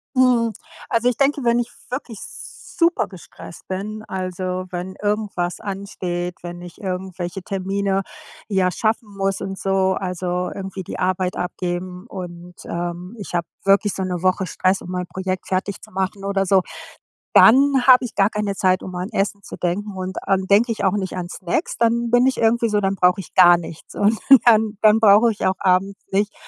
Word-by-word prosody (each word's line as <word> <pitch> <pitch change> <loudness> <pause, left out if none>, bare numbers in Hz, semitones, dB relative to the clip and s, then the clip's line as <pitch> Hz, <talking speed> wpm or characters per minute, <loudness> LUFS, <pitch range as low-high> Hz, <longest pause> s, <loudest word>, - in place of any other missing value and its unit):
Mhm, 240 -3 +3 0.4
also 240 +1 +2
ich 245 - -3
denke, 280 -1 +1
wenn 235 0 +3
ich 240 - -2 0.2
wirklich 250 -4 -5
super 360 -1 -2
gestresst 175 -2 -12
bin, 210 +3 -4
also, 185 0 -3
wenn 180 +1 -5
irgendwas 205 -4 -1
ansteht, 185 -3 -4
wenn 175 0 -7
ich 175 +2 -11
irgendwelche 185 -1 -4
Termine, 195 +1 -1 0.5
ja, 190 -2 +2
schaffen 220 +1 -1
muss 195 0 -1
und 195 0 -5
so, 190 -1 +1
also 180 -1 -2
irgendwie 190 -1 -6
die - - -7
Arbeit 185 0 0
abgeben 180 +1 -4
und, 175 -2 -8
ähm, 175 +4 -5
ich 200 - -8
habe 170 -1 -1 0.2
wirklich 200 +1 +3
so 190 - -3
‘ne 180 -2 -3
Woche 185 +1 +1
Stress, 185 +2 0
um - - -9
mein 180 -1 -3
Projekt 185 -1 -4
fertig 190 +1 -2
zu - - -14
machen 190 +1 -3
oder 195 -1 0
so, 190 0 +4 0.7
dann 270 +1 +6
habe 255 0 +8
ich 245 - -6
gar 195 +2 +4
keine 210 -2 -2
Zeit, 185 -1 +2
um 185 - -7
an 180 +4 -4
Essen 200 0 -1
zu - - -8
denken 190 +3 -2
und 185 0 -5
dann 190 -1 +1
denke 220 +5 +4
ich 210 -2 -3
auch 190 0 +3
nicht 190 -2 -3
an 175 -1 -4
Snacks, 185 - -3
dann 235 0 +1
bin 245 +1 +4
ich 265 - +2
irgendwie 230 +1 +2
so, 210 -1 +1
dann 195 0 0
brauche 180 +1 +3
ich - - -15
gar 175 -1 +8
nichts. 165 -1 -10
Und 210 +2 +2 0.3
dann 220 -2 +4
dann 215 0 +6
brauche 220 +2 +6
ich 210 - -4
auch 185 - +3
abends 195 +1 +1
nicht 205 +2 +1
195 Hz, 185 wpm, -21 LUFS, 185-215 Hz, 0.7 s, habe